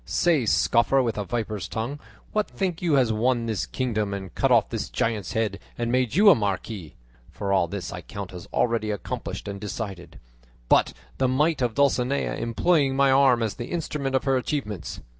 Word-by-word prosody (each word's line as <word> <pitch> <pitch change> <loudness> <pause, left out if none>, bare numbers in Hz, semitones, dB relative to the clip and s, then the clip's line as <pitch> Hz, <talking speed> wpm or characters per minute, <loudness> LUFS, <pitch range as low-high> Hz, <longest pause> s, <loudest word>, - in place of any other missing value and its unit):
Say, 155 -9 +1
scoffer 125 +5 +3
with 115 -3 -2
a - - -1
viper's 110 -4 -3
tongue, 120 +6 -4 0.3
what 215 0 0
think 180 -4 -3
you 170 -4 +1
has 125 -5 +3
won 120 +2 +1
this 110 -5 -2
kingdom 110 -6 -1
and 95 -2 -7
cut - - +1
off - - +4
this - - -3
giant's 105 -6 -1
head 105 -3 -1 0.2
and 120 0 -1
made 125 -1 +1
you 205 +2 +8
a - - +9
marquis 100 - -3 0.3
(for 100 -1 -3
all 95 -3 +3
this 90 -1 -5
I - - -6
count 100 -2 -8
as 90 - -9
already 115 -2 +1
accomplished 105 -1 -5
and 100 -1 -6
decided), 100 -4 -6 0.5
but - - +4 0.3
the 130 - +3
might 150 +4 +1
of 120 -3 0
Dulcinea, 140 -1 +1
employing 135 +4 +1
my 140 0 +4
arm 130 -3 +4
as 110 - -1
the 120 - -6
instrument 150 -5 -2
of 130 - +1
her 135 -2 +2
achievements? 125 - -4
115 Hz, 190 wpm, -25 LUFS, 105-135 Hz, 0.5 s, a